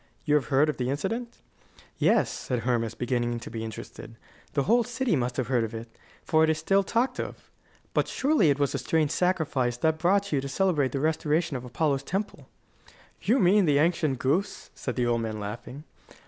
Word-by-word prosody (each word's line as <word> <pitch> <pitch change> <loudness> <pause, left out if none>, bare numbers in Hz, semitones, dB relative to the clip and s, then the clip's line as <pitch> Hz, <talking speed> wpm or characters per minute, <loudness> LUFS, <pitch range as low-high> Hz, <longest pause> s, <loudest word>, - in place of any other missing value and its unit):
You 150 - +2
have 150 -3 +3
heard 140 +2 +3
of 150 - -2
the 125 0 -1
incident?" 225 - -3 0.6
"Yes," - - +3
said 125 -3 -3
Hermas, 115 -2 -1
beginning 120 -1 -1
to - - -8
be 115 -1 -4
interested; 115 +1 -8 0.4
"the 140 - +1
whole 235 - +3
city 245 -3 -1
must 125 -2 -2
have 130 - 0
heard 120 -1 +1
of 115 0 -4
it, 115 0 -9 0.3
for 160 -1 +3
it 160 - +3
is 160 - +2
still 195 +5 +2
talked 235 +6 0
of. - - -7 0.4
But - - +1
surely 265 - +2
it 140 - +2
was 140 -2 0
a 140 - -1
strange 155 +2 +1
sacrifice 150 -10 0
that 160 +5 +2
you - - -15
brought 195 +5 +3
to 140 -8 -2
celebrate 150 -2 +1
the 140 - -1
restoration 155 +1 0
of 125 -1 -5
Apollo's 140 +2 0
temple?" 195 +8 -4 0.7
"You 240 - +2
mean 195 -1 +4
the 145 -3 +3
ancient 155 -3 +2
goose?" 160 +12 -1
said 125 - -5
the 125 - +1
old 120 -1 +1
man 110 -1 -4
laughing. 115 +7 -7
145 Hz, 200 wpm, -27 LUFS, 125-175 Hz, 0.7 s, mean